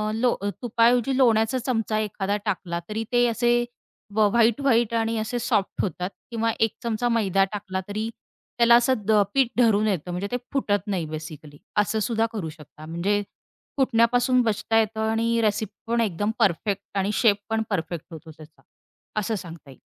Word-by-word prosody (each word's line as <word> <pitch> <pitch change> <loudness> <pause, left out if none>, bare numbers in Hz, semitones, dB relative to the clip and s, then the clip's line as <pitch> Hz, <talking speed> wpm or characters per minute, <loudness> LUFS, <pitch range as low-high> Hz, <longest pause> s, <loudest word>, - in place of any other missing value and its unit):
Low 245 +2 +2 0.3
तुपाऐवजी 240 +2 +2
लोण्याचा 230 -1 +3
चमचा 225 -3 -1
एखादा 205 -1 -2
टाकला 175 -4 -2
तरी 220 +1 -2
ते 245 0 +4
असे 240 +1 +2 0.5
व 215 -1 +5
व्हाईट-व्हाईट 235 0 +3
आणि 225 0 0
असे 220 +3 -2
सॉफ्ट 225 -4 0
होतात 180 0 -3 0.2
किंवा 230 0 0
1 225 -1 +1
चमचा 235 +1 0
मैदा 195 -4 +2
टाकला 190 -2 -4
तरी 215 +2 -3 0.5
त्याला 235 0 +6
असं 220 -4 +3
पीठ 270 -3 +4
धरून 215 -3 +4
येतं 180 -3 -2
म्हणजे 180 +3 -3
ते 245 - 0 0.2
फुटत 205 -7 0
नाही 185 -5 -1
बेसिकली. 155 -1 -8 0.2
असं 210 +1 +2
सुद्धा 225 +1 +1
करू 175 -7 -4
शकता. 155 0 -13
म्हणजे 185 +6 0 0.6
फुटण्यापासून 245 0 +3
बचता 225 0 0
येतं 220 0 0
आणि 230 +1 +1
रेसिपी 210 -1 0 0.2
पण 235 - +2
एकदम 205 0 0
परफेक्ट 200 0 +1
आणि 195 +2 +1
शेप 210 -2 +3
पण 225 0 0
परफेक्ट 170 -4 -3
होतो 160 0 -10
त्याचा 155 +1 -16 0.6
असं 215 +2 -1
सांगता 165 -6 -9
येईल. 130 - -14
215 Hz, 160 wpm, -24 LUFS, 195-235 Hz, 0.6 s, त्याला